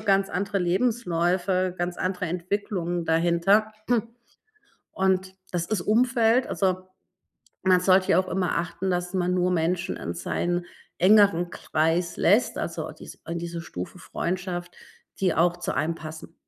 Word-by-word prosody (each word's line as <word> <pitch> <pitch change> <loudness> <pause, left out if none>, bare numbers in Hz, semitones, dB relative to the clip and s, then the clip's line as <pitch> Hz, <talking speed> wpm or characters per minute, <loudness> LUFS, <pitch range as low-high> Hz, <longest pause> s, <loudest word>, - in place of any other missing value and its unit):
ganz 195 -2 +2
andere 200 +2 -1
Lebensläufe, 180 -2 +1
ganz 175 0 -3
andere 185 0 -1
Entwicklungen 175 0 -2
dahinter. 170 +6 +3 1.2
Und 190 0 0 0.2
das 175 -2 -2
ist 205 -3 -1
Umfeld 240 +2 +3
also 185 -1 -1 0.8
man 185 -1 +5
sollte 185 +1 +4
ja - - +5
auch 185 - +1
immer 185 -3 0
achten, 180 +2 -3
dass 180 +1 -2
man 180 -1 +1
nur 180 0 +2
Menschen 175 +2 0
in 85 - -5
seinen 175 - -2 0.3
engeren 190 -2 +5
Kreis 165 +3 0
lässt 210 +8 +3
also - - -4
dies - - -12
in 170 - -2
diese 170 0 -5
Stufe 90 - -7
Freundschaft, 175 0 -4 0.5
die 185 -3 +2
auch 175 +1 +3
zu 175 - -2
einem 155 +5 0
passen. 155 -1 -9
180 Hz, 140 wpm, -25 LUFS, 170-190 Hz, 1.2 s, man